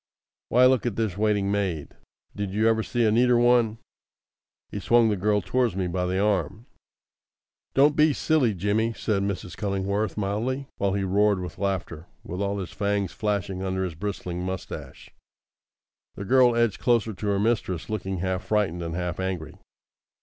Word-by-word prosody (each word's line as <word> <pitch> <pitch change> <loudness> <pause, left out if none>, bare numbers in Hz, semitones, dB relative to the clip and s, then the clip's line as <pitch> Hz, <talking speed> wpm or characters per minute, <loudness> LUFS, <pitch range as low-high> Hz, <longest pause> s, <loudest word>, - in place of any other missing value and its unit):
Why, 125 +2 +5
look 130 -2 +3
at 115 - -2
this 110 -5 -1
waiting 105 -1 +1
maid! 95 -7 -1 0.5
Did 100 -1 -4
you 110 +1 +3
ever 110 0 +3
see 120 +1 0
a 110 - +3
neater 120 +2 +4
one?" 120 -2 +3 0.9
He - - -4
swung 120 -1 +4
the 105 - +1
girl, 105 +2 +1
towards 125 -6 0
me 95 -1 -1
by 90 +1 -1
the 95 +1 -1
arm. 100 +1 0 1.1
"Don't 145 +2 +5
be 155 0 +5
silly, 140 -7 +1
Jimmy," 105 +5 0
said 105 -3 -1
Mrs. 100 -3 -4
Cullingworth 100 +1 -2
mildly, 115 +7 -2
while 100 -1 0
he 100 -1 -1
roared 100 +1 +2
with 90 +1 -7
laughter, 95 -4 -3 0.2
with 90 +3 -5
all 100 0 -1
his 95 -4 -5
fangs 100 -2 -1
flashing 100 -3 -2
under 95 0 -1
his 90 -3 -3
bristling 90 0 -4
moustache. 95 0 -6 1.0
The 100 - -6
girl 125 +1 +5
edged 115 -4 +1
closer 115 -3 +2
to 105 +2 -5
her 100 -1 +1
mistress, 105 -6 -1
looking 95 -3 -3
half 95 +2 -2
frightened 100 -5 0
and 85 -1 -4
half 90 0 -3
angry. 95 -4 -3
100 Hz, 170 wpm, -25 LUFS, 95-115 Hz, 1.1 s, Why